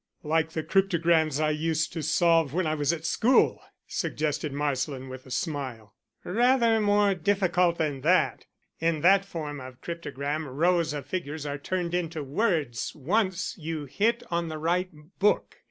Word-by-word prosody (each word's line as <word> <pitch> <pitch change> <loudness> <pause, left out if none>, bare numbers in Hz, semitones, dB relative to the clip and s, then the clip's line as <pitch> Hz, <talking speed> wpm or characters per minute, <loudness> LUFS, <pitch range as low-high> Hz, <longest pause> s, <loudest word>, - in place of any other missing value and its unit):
"Like 160 +1 0
the 160 - -2
cryptograms 170 -6 +2
I 155 0 +2
used 160 +1 -1
to 165 - -3
solve 165 -1 +2
when 185 -1 +1
I 155 - 0
was 150 0 +1
at 165 -1 -4
school," 250 +9 +3 0.3
suggested 150 -1 -2
Marsland, 135 -2 -2
with 130 0 -9
a - - -12
smile. 130 - -4 0.3
"Rather 235 +2 +3
more 205 -1 +3
difficult 180 -2 +1
than 145 -4 -1
that. 175 +6 +2 0.3
In 165 -2 0
that 195 +3 +5
form 155 -6 -5
of 130 -1 -10
cryptogram 150 -2 -4
rows 165 +4 +1
of 145 -1 -5
figures 155 -4 -4
are 145 0 -4
turned 175 +2 -2
into 165 -3 -2
words 145 - -1
once 185 - 0
you 155 -2 -4
hit 225 - 0
on 170 0 0
the 155 -1 -5
right 175 +4 0 0.3
book. 205 +2 +1
160 Hz, 155 wpm, -27 LUFS, 145-180 Hz, 0.3 s, that